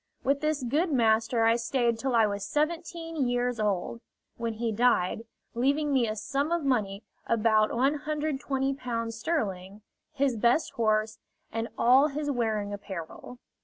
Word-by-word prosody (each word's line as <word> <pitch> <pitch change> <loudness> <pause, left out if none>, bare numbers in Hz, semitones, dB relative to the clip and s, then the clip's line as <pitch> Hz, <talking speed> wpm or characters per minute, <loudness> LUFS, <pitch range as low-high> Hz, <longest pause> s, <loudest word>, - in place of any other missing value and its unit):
With 275 +1 +1
this 305 -2 0
good 305 +8 0
master 225 -2 +2
I 230 +1 +4
stayed 235 -1 0
till 265 0 -1
I 225 -1 +5
was 200 -1 -3
seventeen 330 - -2
years 245 -1 -1
old, 210 +2 -1 0.3
when 230 -1 -3
he 225 +1 -2
died, 225 -2 +1 0.3
leaving 280 +4 +1
me 250 -4 +3
a 215 - -2
sum 280 +7 -2
of 340 -2 0
money, 215 -7 0 0.2
about 220 -1 +3
Ł120 270 -3 -1
sterling, 210 - -3 0.3
his 270 -4 0
best 240 +8 +2
horse, 215 -1 0 0.3
and 225 0 -2
all 260 +5 +5
his 290 0 -3
wearing 215 -5 -1
apparel. 200 +3 -8
240 Hz, 140 wpm, -28 LUFS, 220-280 Hz, 0.3 s, I